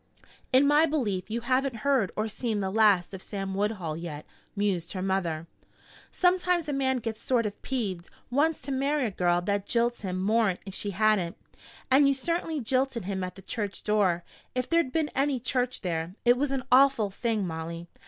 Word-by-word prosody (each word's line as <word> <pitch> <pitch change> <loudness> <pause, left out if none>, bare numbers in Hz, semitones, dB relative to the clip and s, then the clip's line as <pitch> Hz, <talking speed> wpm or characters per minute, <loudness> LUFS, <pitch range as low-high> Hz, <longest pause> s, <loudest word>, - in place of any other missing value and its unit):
"In 260 +2 +5
my 295 +3 +5
belief 210 - -1
you 230 +2 -2
haven't 260 +1 +1
heard 265 -9 +2
or 215 +1 -1
seen 220 0 -2
the 190 -1 -1
last 205 -4 +3
of 190 - -7
Sam 195 -1 -5
Woodhull 195 -5 -1
yet," 160 -2 -6 0.3
mused 195 -5 -1
her 185 - -3
mother. 175 -5 -1 0.7
"Sometimes 360 -2 +2
a 295 - -1
man 265 -1 +1
gets 225 -2 -5
sort 240 -3 +1
of 205 -1 -5
peeved 195 -9 -3 0.2
wants 300 +5 +2
to 280 - -5
marry 275 +1 +1
a 220 - -1
girl 175 -1 +1
that 200 +2 -1
jilts 235 0 +1
him 185 -2 -3
more'n 210 -1 +2
if 195 - -7
she 205 - -3
hadn't. 200 -3 +1 0.5
And 275 +2 +6
you 275 - +3
certainly 330 +2 -2
jilted 255 -3 0
him 190 -1 -2
at 180 0 -5
the 195 - -13
church 205 -1 -4
door, 195 -5 +2 0.3
if 255 0 -1
there'd 335 -6 +2
been 310 +1 0
any 275 -1 +1
church 250 +1 -1
there. 170 -1 -3
It 240 0 +6
was 280 +3 0
an 270 -1 -2
awful 255 -5 +5
thing, 220 -1 -1
Molly. 165 0 -5
220 Hz, 190 wpm, -28 LUFS, 190-265 Hz, 0.7 s, And